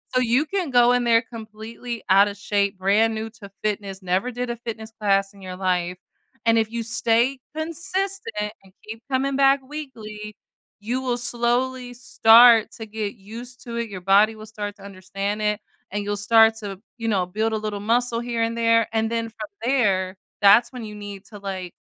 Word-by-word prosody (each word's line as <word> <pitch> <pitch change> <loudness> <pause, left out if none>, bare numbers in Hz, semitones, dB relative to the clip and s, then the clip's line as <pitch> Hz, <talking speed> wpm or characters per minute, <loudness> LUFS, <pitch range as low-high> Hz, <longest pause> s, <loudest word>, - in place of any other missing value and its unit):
So, 255 - +4
you 250 +5 +2
can 365 -1 -2
go 245 -1 +5
in 245 0 +2
there 230 -1 +5
completely 225 +1 -8
outta 200 +1 +5
shape, 200 -1 -1
brand 210 +4 +2
new 220 +1 -4
to 210 -3 -13
fitness, 200 -2 -3
never 185 +7 0
did 245 +1 -4
a - - -3
fitness 225 -1 -7
class 195 -1 +1
in 200 - -16
your 185 -1 -7
life, 180 -1 -1 0.5
and 230 0 +4
if 220 -1 0
you 235 0 -3
stay 235 +3 +1 0.2
consistent 335 - -3
and 190 - -19 0.2
keep 220 +1 -8
coming 270 +1 +1
back 275 0 +4
weekly, 215 -8 -8 0.4
you 240 +5 -2
will 250 -2 -1
slowly 245 +1 -1
start 230 -1 +6
to 225 - -8
get 215 -1 -4
used 235 +5 -10
to 235 -1 -6
it. 235 -1 -3
Your 195 -2 -6
body 200 +4 +4
will 215 0 -10
start 205 -2 -6
to 195 - -15
understand 200 +2 -4
it, 210 0 0 0.3
and 205 +1 -2
you'll 205 0 -2
start 225 +2 +5
to, 200 -3 -7 0.2
you 230 -1 -4
know, 195 -5 +1
build 215 +5 -1
a - - +1
little 210 -1 -4
muscle 235 +2 +1
here 235 -1 -1
and 230 0 -1
there, 230 -1 +3
and 220 0 0
then 230 -1 -1
from 215 -1 -8
there, 200 -8 +1 0.3
that's 205 +4 +6
when 250 -2 -7
you 210 -1 -8
need 205 -1 -9
to, 205 -1 -12
like, 190 -3 -5
220 Hz, 190 wpm, -23 LUFS, 205-240 Hz, 0.5 s, start